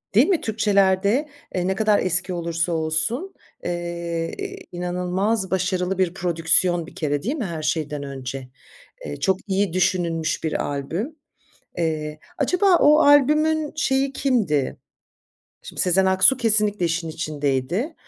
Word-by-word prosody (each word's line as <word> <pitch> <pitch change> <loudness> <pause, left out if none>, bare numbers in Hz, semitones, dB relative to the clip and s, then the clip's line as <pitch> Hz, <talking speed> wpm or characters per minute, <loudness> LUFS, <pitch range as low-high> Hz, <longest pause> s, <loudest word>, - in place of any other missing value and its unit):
değil 245 +8 +6
mi 370 -5 +2
Türkçelerde, 205 +4 +2 0.3
eee, 180 0 0
ne 190 - 0
kadar 210 0 +3
eski 185 +1 -1
olursa 170 0 -2
olsun, 165 - -1 0.3
eee, 170 -1 -3 0.4
inanılmaz 180 +4 -1
başarılı 185 0 0
bir 185 -2 +1
prodüksiyon 170 -1 +1
bir - - -14
kere 145 -1 -2
değil 265 +8 -1
mi 240 -9 -3
her 165 -3 -5
şeyden 150 -2 -2
önce? 135 -1 -6 0.6
Eee, - - -6
çok 190 -2 +2
iyi 195 -2 0
düşünülmüş 175 -4 0
bir 160 - -1
albüm. 165 - -4 0.6
Eee, 155 -2 -2 0.2
acaba 360 +6 +3
o 300 +1 +6
albümün 300 +2 +4
şeyi 270 -1 +1
kimdi? 215 - 0 0.9
Şimdi - - -6
Sezen 190 +1 +3
Aksu 190 +8 +5
kesinlikle 210 -5 +1
işin 165 0 -1
içindeydi. 155 - -2
185 Hz, 130 wpm, -23 LUFS, 165-220 Hz, 0.9 s, değil